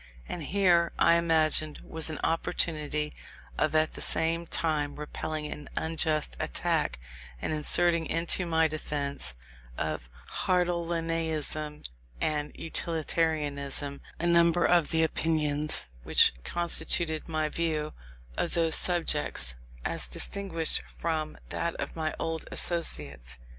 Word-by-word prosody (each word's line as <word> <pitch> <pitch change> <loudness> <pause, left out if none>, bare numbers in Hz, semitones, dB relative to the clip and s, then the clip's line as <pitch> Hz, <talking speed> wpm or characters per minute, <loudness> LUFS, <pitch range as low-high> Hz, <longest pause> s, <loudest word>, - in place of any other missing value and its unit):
And 175 - -5
here, 175 0 +3
I - - +5
imagined, 160 -2 +3
was 160 -1 +1
an 155 - -4
opportunity 150 -2 0 0.4
of - - 0
at 155 0 +2
the - - -7
same 165 +1 0
time 150 -4 -1
repelling 150 +1 -5
an 150 -1 -7
unjust 160 -1 +1
attack, - - 0 0.4
and 155 - -3
inserting 165 +2 +2
into 170 +2 +1
my 160 -1 +3
defence 140 - -2 0.4
of - - -3 0.4
Hartleianism 165 -4 -1 0.4
and 150 -1 -1
Utilitarianism 150 -4 -2 0.2
a 170 - -2
number 170 0 +4
of 175 -4 +3
the 160 0 +2
opinions 155 - 0 0.2
which - - +5
constituted 165 - +1
my 155 -1 0
view 155 -1 -2 0.4
of - - 0
those 165 -2 +5
subjects, 150 - +2 0.3
as - - +3
distinguished 180 -5 0
from 155 -2 -3
that 170 0 -2
of - - -5
my 155 -1 -2
old 165 0 -3
associates. 65 - +1
160 Hz, 115 wpm, -28 LUFS, 150-170 Hz, 0.4 s, I